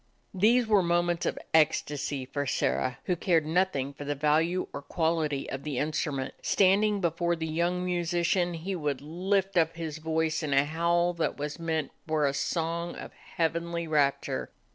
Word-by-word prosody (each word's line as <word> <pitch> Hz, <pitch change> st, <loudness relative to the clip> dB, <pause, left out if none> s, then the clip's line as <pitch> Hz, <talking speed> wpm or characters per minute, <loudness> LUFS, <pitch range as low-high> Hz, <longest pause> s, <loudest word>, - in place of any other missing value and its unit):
These 230 Hz, +6 st, +4 dB
were 210 Hz, -3 st, +4 dB
moments 175 Hz, 0 st, +1 dB
of -, -, -1 dB, 0.2 s
ecstasy 145 Hz, -3 st, +1 dB
for 140 Hz, +2 st, -3 dB
Sirrah, 130 Hz, -1 st, 0 dB
who 180 Hz, -, 0 dB
cared 165 Hz, -2 st, +2 dB
nothing 155 Hz, -5 st, 0 dB
for 140 Hz, -, -8 dB
the 145 Hz, 0 st, -2 dB
value 155 Hz, +5 st, +2 dB
or 140 Hz, -, -5 dB
quality 160 Hz, -2 st, -1 dB
of 135 Hz, -, -5 dB
the 145 Hz, -3 st, -4 dB
instrument. 145 Hz, -2 st, -2 dB
Standing 200 Hz, +1 st, +3 dB
before 170 Hz, 0 st, +1 dB
the 160 Hz, -1 st, -4 dB
young 170 Hz, +3 st, 0 dB
musician 175 Hz, 0 st, 0 dB
he 185 Hz, +4 st, -4 dB
would 150 Hz, -5 st, -2 dB
lift 185 Hz, +5 st, -1 dB
up 165 Hz, -1 st, +3 dB
his 160 Hz, -2 st, -5 dB
voice 160 Hz, 0 st, 0 dB
in 150 Hz, -3 st, -1 dB
a 135 Hz, +1 st, +4 dB
howl 170 Hz, +3 st, +1 dB
that 170 Hz, -1 st, -1 dB
was 150 Hz, +2 st, -4 dB
meant 160 Hz, -4 st, -2 dB, 0.2 s
for 155 Hz, -2 st, +1 dB
a 140 Hz, -, +1 dB
song 170 Hz, +3 st, -2 dB
of -, -, -9 dB
heav 165 Hz, -1 st, -2 dB
enly 170 Hz, 0 st, -3 dB
rapture. 145 Hz, -3 st, 0 dB
165 Hz, 170 wpm, -28 LUFS, 150-175 Hz, 0.2 s, These